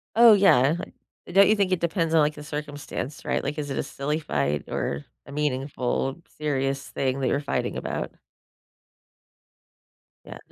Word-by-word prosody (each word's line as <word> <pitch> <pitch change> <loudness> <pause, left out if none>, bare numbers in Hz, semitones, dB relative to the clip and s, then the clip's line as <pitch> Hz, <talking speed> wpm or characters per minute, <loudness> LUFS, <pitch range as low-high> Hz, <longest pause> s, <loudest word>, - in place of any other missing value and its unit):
Oh, 230 -1 +9
yeah. 160 -8 +5 0.6
Don't 200 +2 +7
you 215 - +4
think 190 -2 +1
it 180 - +1
depends 165 -1 0
on, 160 - +6
like, 150 0 +2
the 150 - -9
circumstance? 145 -2 -6
Right? - - 0
Like, 150 +2 -3
is 145 -1 -3
it - - -2
a - - +1
silly 150 +3 -2
fight 75 - -1
or 70 +1 -2 0.2
a - - -10
meaningful, 135 0 -1 0.2
serious 135 -2 -1
thing 135 0 -1
that 130 - +1
you're 140 - +1
fighting 140 -1 -2
about? - - -3 2.1
Yeah. - - -9
145 Hz, 160 wpm, -25 LUFS, 135-160 Hz, 2.1 s, Oh